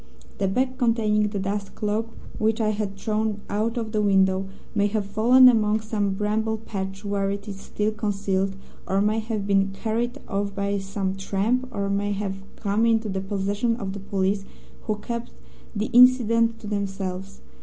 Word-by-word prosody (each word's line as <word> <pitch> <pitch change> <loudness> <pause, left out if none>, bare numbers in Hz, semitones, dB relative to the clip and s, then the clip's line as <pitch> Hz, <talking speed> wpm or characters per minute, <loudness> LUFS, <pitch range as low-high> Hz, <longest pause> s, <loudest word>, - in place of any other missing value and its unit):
The 195 - +2
bag, 255 +6 0
containing 215 -3 +2
the 205 0 -4
dust 200 +1 -3
cloak, 215 +1 -1 0.3
which 220 +1 +1
I 215 -1 +2
had 205 -2 -2
thrown 215 0 -1
out 220 +3 0
of 225 -2 -3
the 215 -1 +1
window, 190 -1 +3 0.3
may 205 -2 +3
have 205 -1 -1
fallen 235 +6 +6
among 215 -3 +4
some 210 -3 -1
bramble 220 +2 0
patch 195 -2 -6
where 200 -1 0
it 200 +2 -4
is 195 -2 -6
still 210 +2 -2
concealed, 200 -3 -1 0.3
or 195 +1 +1
may 210 +2 +2
have 220 -2 -3
been 195 -1 +3
carried 230 +4 -2
off 200 -1 -2
by 200 0 0
some 195 0 -2
tramp, 205 +6 0
or 200 -5 -2
may 200 +1 0
have 195 -1 -3
come 210 +2 +1
into 225 -1 +2
the 190 -1 -2
possession 200 +4 -1
of 195 -5 -4
the 200 - -6
police, 195 0 0 0.4
who 215 - 0
kept 235 +2 -5 0.4
the 210 +1 -2
incident 230 -2 +6
to - - -9
themselves. 195 -2 -4
205 Hz, 175 wpm, -25 LUFS, 195-220 Hz, 0.4 s, fallen